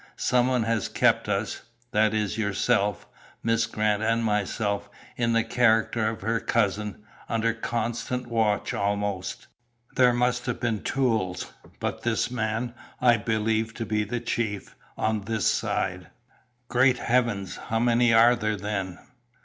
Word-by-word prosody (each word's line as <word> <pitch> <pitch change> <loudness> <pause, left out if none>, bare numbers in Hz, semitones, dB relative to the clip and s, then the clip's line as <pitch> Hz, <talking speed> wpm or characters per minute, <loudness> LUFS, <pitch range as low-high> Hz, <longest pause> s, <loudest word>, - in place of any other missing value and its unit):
Some 125 0 +2
one 125 -2 +1
has 115 -2 0
kept - - +2
us - - -1 0.3
that 110 -2 +3
is, 105 -2 -1
yourself, 105 -2 0 0.4
Miss 115 0 +2
Grant 105 -1 0
and 115 +1 +1
myself, 105 -1 -1 0.3
in 115 -1 +1
the 115 0 +3
character 110 -2 +2
of 110 - -6
her 115 +3 0
cousin 105 -2 -1 0.3
under 115 0 +1
constant 120 +2 -3
watch, 110 -3 0
almost. 100 -2 -2 0.5
There 125 -1 +5
must 125 +1 0
have 125 - -2
been 115 -3 -1
tools, 110 -9 -1 0.3
but - - -3
this 120 +1 0
man 115 0 -2 0.3
I 120 -2 +5
believe 110 0 -1
to 115 - -4
be 105 -1 0
the 120 +4 -3
chief, 110 -4 -3 0.2
on 110 -1 0
this 110 +1 -2
side." 90 -1 0 0.6
"Great 125 +1 +3
heavens! 115 -7 0
How 115 - 0
many 120 +1 +3
are 115 +2 +6
there, 110 -2 -1
then?" 100 -2 -3
110 Hz, 140 wpm, -26 LUFS, 105-120 Hz, 0.6 s, are